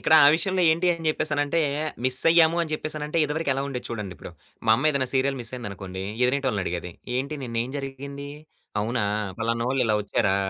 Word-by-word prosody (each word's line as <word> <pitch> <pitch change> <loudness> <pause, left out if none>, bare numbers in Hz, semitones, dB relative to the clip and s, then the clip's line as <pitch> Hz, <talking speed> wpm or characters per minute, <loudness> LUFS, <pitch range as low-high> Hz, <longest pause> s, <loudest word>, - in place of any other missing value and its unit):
ఇక్కడ 160 - +4
ఆ - - +9
విషయంలో 185 +2 +1
ఏంటి 170 +3 0
అని 165 -2 -2
చెప్పేసనంటే 150 0 0 0.4
మిస్సయ్యాము 165 +6 +5
అని 160 - -5
చెప్పేసనంటే 155 +1 -2
ఇదివరకెలా 145 -3 -1
ఉండేది 125 -3 -5
చూడండి 105 -5 -5
ఇప్పుడు. - - -9 0.4
మా - - +5
అమ్మేదైనా 140 -2 +1
సీరియల్ 135 +1 +2
మిస్సయిందనుకోండి, 100 -6 -6 0.2
ఎదురింటోళ్లనడిగేది. 105 -10 -1 0.3
"ఏంటి 140 +4 -2
నిన్నేం 115 0 -2
జరిగింది? 140 +1 -7 0.5
అవునా? 115 +1 0 0.4
పలానోళ్ళు 115 +3 0
ఇలా 110 - +2
ఒచ్చారా? 95 -1 +1
135 Hz, 145 wpm, -25 LUFS, 115-155 Hz, 0.5 s, ఆ